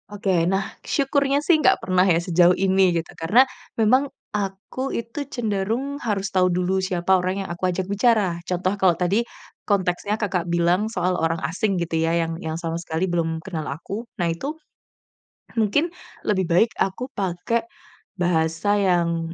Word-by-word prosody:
Oke 190 -4 +1
nah, 195 +1 0 0.2
syukurnya 280 0 +1
sih 320 -3 +4
nggak - - +5
pernah 185 0 +3
ya 165 - +4
sejauh 175 +1 +3
ini, 190 -2 +3
gitu. 165 - -4
Karena, 210 +11 +4 0.3
memang 255 +5 +3 0.2
aku 205 +6 -3
itu 235 +5 -4
cenderung 235 +3 -2
harus 200 -4 -2
tahu 185 -1 +4
dulu 180 +2 0
siapa 185 -1 -1
orang 185 +2 -2
yang - - -8
aku 175 - -13
ajak 180 +1 -2
bicara. 205 -5 +2
Contoh 185 +1 0
kalau 185 -3 +4
tadi, 190 +5 +2 0.5
konteksnya 200 0 0
Kakak 185 -5 -1
bilang 175 +4 +2
soal 185 -4 0
orang 165 0 0
asing 190 +5 0
gitu 170 -1 -2
ya, 165 0 +1
yang 165 0 -2
yang 160 0 -3
sama 165 0 -3
sekali 165 +1 -2
belum 165 -2 -1
kenal 160 -5 -4
aku. 200 - -5
Nah 175 - +1
itu, 275 - -4 1.0
mungkin, 225 - +2 0.4
lebih 190 -3 +2
baik 180 +7 +4
aku 195 +7 -1
pakai 195 +5 -1 0.6
bahasa 165 +3 +1
yang, 170 -4 +1
185 Hz, 160 wpm, -23 LUFS, 170-210 Hz, 1.0 s, nggak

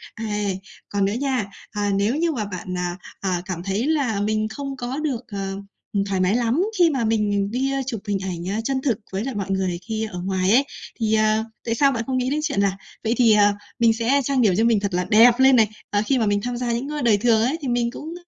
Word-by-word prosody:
Ây, 210 -3 -2 0.3
còn 200 -1 +1
nữa 200 - 0
nha. 255 -2 -1 0.3
À, 205 -1 -1
nếu 205 +6 +1
như 335 +2 +1
mà 230 -8 -2
bạn, 185 -2 -5
à, 180 0 -2 0.2
à, 185 -3 -1
cảm 180 -3 -5
thấy 200 +7 -1
là 270 -10 +1
mình 215 +1 0
không 275 +4 -6
có 245 +2 -4
được, 280 -6 -2
ờ, 195 -3 -4 0.5
thoải 190 -1 0
mái 185 +3 +2
lắm 240 +6 +1 0.2
khi 345 -2 +6
mà 265 -6 0
mình 205 -2 +1
đi 265 +3 0
chụp 240 -4 -3
hình 205 -1 +1
ảnh 190 +4 -3
chân 265 +2 -1
thực 245 -6 0
với 195 +2 -2
lại 265 -3 -4
mọi 195 -1 -3
người 190 -2 -1
khi 220 -1 -2
ở 180 - -5
ngoài 190 0 +1
ấy, 265 +5 +5 0.3
thì, 220 -1 +1
ờ, 215 0 +2 0.2
tại 230 - 0
sao 275 +3 +4
bạn 230 -3 -2
không 260 -1 0
nghĩ 255 0 0
đến 295 +2 0
chuyện 280 -10 0
là 195 -1 +1 0.3
vậy 225 - +1
thì, 230 -3 +5
à, 205 -1 +5 0.3
mình 230 -1 +5
sẽ 235 +5 +2
trang 270 0 +1
điểm 210 -5 +4
cho 225 - +3
mình 230 -2 +3
thật 200 -1 -3
là 180 +1 +1
đẹp 235 +3 +6
lên 265 0 +6
này, 225 -3 +5 0.2
ờ, 205 - +1
khi 270 - +2
mà 230 - +1
mình 205 -1 +1
tham 245 0 -3
gia 240 -1 -1
những 240 +5 -2
cái 300 0 -3
đời 225 -4 +4
thường 220 +1 +3
ấy, 260 +8 +1
thì 280 - -4
mình 240 -1 0
cũng 310 +5 -7
220 Hz, 255 wpm, -22 LUFS, 200-255 Hz, 0.5 s, khi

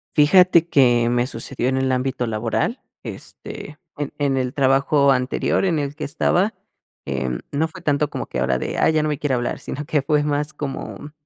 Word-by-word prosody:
Fíjate 170 +2 +5
que 120 -6 +4
me 120 +1 +1
sucedió 130 -2 -3
en 130 - 0
el 130 0 +1
ámbito 130 -1 -1
laboral, 115 - -1 0.2
este, 150 - -9 0.2
en 145 -1 -4
en 140 -2 +1
el 130 -1 -1
trabajo 140 +1 +3
anterior 130 +8 +1
en 175 -4 +1
el 140 0 -3
que 155 - -6
estaba, 175 +7 +1 0.5
eh, 65 -2 -2 0.2
no 155 +3 +1
fue 165 +2 -12
tanto 150 -2 +1
como - - -4
que - - -5
ahora 65 - +1
de: - - -4
"Ah, - - +4
ya 155 -1 +2
no 155 - 0
me 150 -2 -2
quiere 145 -4 0
hablar", 120 -1 -2
sino 145 +2 -6
que 150 0 +1
fue 145 +2 +1
más 150 +1 -1
como 145 0 -6
140 Hz, 195 wpm, -21 LUFS, 130-150 Hz, 0.5 s, Fíjate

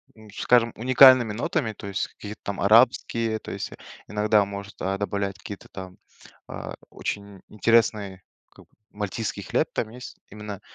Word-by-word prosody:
м, 110 -1 -16
скажем, 120 -1 +3
уникальными 130 -1 +7
нотами. 120 -1 -1
То 100 - -9
есть 100 0 -2
каких-то 105 +1 -10
там 100 - -4
арабские, 115 +1 +3
то - - -9
есть, - - -5 0.4
иногда 105 0 +3
может, 100 0 -8
а, 95 +1 -1
добавлять 100 -1 -2
какие-то 105 -2 -9
там, 95 -1 -9 0.5
а, - - -7
очень 100 -2 -6
интересный, 105 -3 +1 0.3
как - - -18
бы, - - -47 0.2
мальтийский 105 0 -4
хлеб 120 +10 0
там 110 - -2
есть. 125 +2 -10
Именно, 105 -1 -8
105 Hz, 150 wpm, -25 LUFS, 100-115 Hz, 0.5 s, уникальными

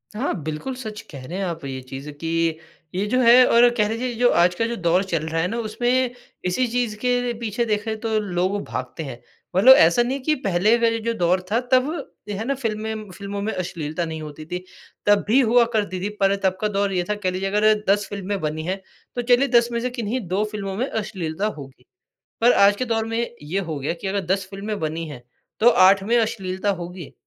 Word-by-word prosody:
हाँ, 255 +6 -1
बिल्कुल 155 - -4
सच 215 -4 -7
कह 135 -4 -9
रहे 175 +7 -5
हैं 195 - -1
आप 165 -3 -5
ये 130 -1 -4
चीज़ 135 +2 -7
कि 145 +3 -7 0.7
ये 195 - 0
जो 255 +4 +1
है 250 +1 +8
और 240 +1 +6
कह 210 -1 +2
लीजिए 240 +2 -2
जो 245 +1 +4
आजकल 180 +6 +2
जो 235 - -2
दौर 175 +3 +3
चल 165 -5 -2
रहा 165 +1 0
है 180 - +1
ना 230 - -3
उसमें 245 +3 0 0.3
इसी 240 +8 +1
चीज़ 235 -2 -1
के 245 0 0
पीछे 235 0 -1
देखें 215 0 -2
तो 220 -1 0
लोग 190 0 -1
भागते 130 +5 -5
हैं। 130 -4 -7 0.4
मतलब 250 +8 +9
ऐसा 170 +7 +5
नहीं 265 +3 -2
कि 310 +1 +2
पहले 195 +5 +3
का 230 - +3
ये 230 0 0
जो 230 - +2
दौर 180 -2 +1
था 230 - +3
तब 255 +3 +4 0.4
है 205 +2 -3
ना 275 - 0
फ़िल्में 220 -4 -4
फ़िल्मों 200 +2 -6
में 215 +2 -1
अश्लीलता 170 -2 -3
नहीं 160 -1 -5
होती 155 0 -8
थी। 180 +2 -5 0.4
तब 205 0 +4
भी 235 +6 +5
हुआ 240 0 +4
करती 205 -4 -1
थी 205 - -1
पर 195 0 +4
तब 185 -1 +1
का 215 - +2
दौर 200 -1 0
ये 180 -1 +1
था 210 - +1
कह 190 -3 -2
लीजिए 190 +1 -2
अगर 210 +2 +4 0.2
10 205 0 +3
फ़िल्में 200 0 -3
बनी 155 +1 -2
हैं, 190 +2 -3 0.3
तो 245 - 0
चलिए 245 +3 +3
10 240 -2 +4
में 235 - -1
से 250 - -1
किन्हीं 240 0 -3
2 190 +4 0
फ़िल्मों 195 -2 -4
में 255 +5 0
अश्लीलता 195 -4 -3
होगी। 135 -2 -12 0.6
पर 240 +2 +6
आज 200 +1 +5
के 255 - -1
दौर 225 -2 0
में 225 0 -2 0.2
ये 160 +6 -2
हो 165 -6 -4
गया 145 +4 -2
कि - - -5
अगर 200 +1 0
10 195 -1 -5
फ़िल्में 205 +2 -4
बनी 160 +1 -3
हैं, 135 -5 -9 0.4
तो 230 - +7
8 190 -1 +6
में 230 +5 +1
अश्लीलता 200 -3 -1
होगी। 175 -2 -8
205 Hz, 225 wpm, -23 LUFS, 180-230 Hz, 0.7 s, मतलब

